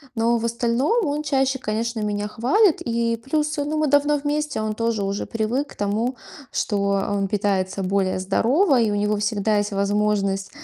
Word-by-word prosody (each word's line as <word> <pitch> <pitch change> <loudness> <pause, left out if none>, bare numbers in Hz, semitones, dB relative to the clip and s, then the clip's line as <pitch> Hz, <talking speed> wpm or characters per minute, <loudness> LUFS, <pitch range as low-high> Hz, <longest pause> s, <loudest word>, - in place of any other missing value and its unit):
Но 230 +1 +2
в 230 - -3
остальном 250 - +1
он 295 +1 -1
чаще, 270 -2 0
конечно, 230 0 -2
меня 210 0 -2
хвалит, 295 - +3
и 230 -1 0
плюс, 300 +5 -1
ну, 290 +2 -1
мы 305 -1 +1
давно 290 +1 +3
вместе, 295 -3 -2
он 215 0 -2
тоже 230 -2 -1
уже 195 +1 -2
привык 235 +6 -2
к - - -20
тому, 220 +5 -1 0.3
что 205 - -1 0.3
он 200 -1 0
питается 195 -1 -1
более 190 0 0
здорово, 255 - +2
и 225 -2 +2
у - - 0
него 210 0 0
всегда 210 0 0
есть 205 0 -1
возможность, 200 -1 0
225 Hz, 175 wpm, -22 LUFS, 205-270 Hz, 0.3 s, хвалит